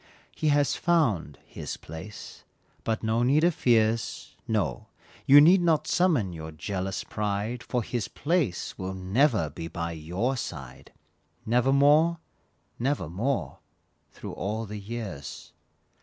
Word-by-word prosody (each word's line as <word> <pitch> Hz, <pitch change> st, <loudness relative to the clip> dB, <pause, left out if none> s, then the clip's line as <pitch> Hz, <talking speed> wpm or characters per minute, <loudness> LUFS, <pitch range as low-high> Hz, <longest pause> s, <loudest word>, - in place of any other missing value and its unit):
He 155 Hz, -, -1 dB
has 145 Hz, -1 st, +3 dB
found 120 Hz, -, +1 dB
"his -, -, -6 dB
place," 80 Hz, +7 st, -10 dB, 0.4 s
but 115 Hz, 0 st, -2 dB
no 110 Hz, +1 st, +1 dB
need 140 Hz, +6 st, +3 dB
of 175 Hz, 0 st, +4 dB
fears, 115 Hz, -4 st, +1 dB
No; 105 Hz, -6 st, -1 dB, 0.4 s
you 140 Hz, +2 st, +10 dB
need 175 Hz, +5 st, +7 dB
not 165 Hz, -3 st, +2 dB
summon 150 Hz, -, +2 dB
your 80 Hz, -1 st, -7 dB
jealous 95 Hz, +4 st, -3 dB
pride, 105 Hz, +3 st, -2 dB
For 125 Hz, -1 st, -2 dB
"his 120 Hz, -2 st, -3 dB
place" 150 Hz, -, -1 dB
will 95 Hz, 0 st, -4 dB
never 100 Hz, -, +2 dB
be 80 Hz, -, -6 dB
by 85 Hz, 0 st, -4 dB
your 90 Hz, +11 st, -2 dB
side, 65 Hz, -, -7 dB, 0.5 s
Nevermore, 140 Hz, +7 st, +4 dB, 0.6 s
nevermore, 115 Hz, -, -1 dB, 0.5 s
through -, -, -8 dB
all 110 Hz, +3 st, -3 dB
the 105 Hz, 0 st, -6 dB
years. 100 Hz, -, -7 dB
110 Hz, 125 wpm, -27 LUFS, 95-140 Hz, 0.6 s, you